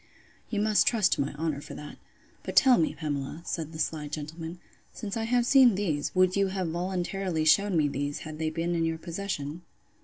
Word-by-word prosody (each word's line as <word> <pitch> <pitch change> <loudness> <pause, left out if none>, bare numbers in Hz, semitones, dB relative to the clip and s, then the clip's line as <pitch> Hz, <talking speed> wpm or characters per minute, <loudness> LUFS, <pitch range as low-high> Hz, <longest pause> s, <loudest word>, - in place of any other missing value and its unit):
You 210 - -1
must 215 -1 +3
trust 220 -6 +3
to - - 0
my 140 - -1
honour 150 -2 -2
for 145 -1 -9
that. 150 - -9 0.4
But - - -6
tell 260 -2 +6
me, 160 - +1
Pamela, 150 +1 -4
said 160 -2 -3
the 160 - -8
sly 155 -1 -2
gentleman, 160 +3 -6 0.3
since 210 -1 -6
I 225 -1 -1
have 240 +1 +2
seen 255 -4 +6
these, 160 -8 -1
would 185 0 +4
you 200 0 +2
have 190 -3 -2
voluntarily 180 -1 -2
shewn 200 +3 +4
me 150 -2 +3
those, 145 +1 -3
had 155 -1 -8
they 160 -1 0
been 165 +2 -2
in 165 -1 0
your 165 0 0
possession? 170 -3 -5
165 Hz, 205 wpm, -28 LUFS, 155-195 Hz, 0.4 s, tell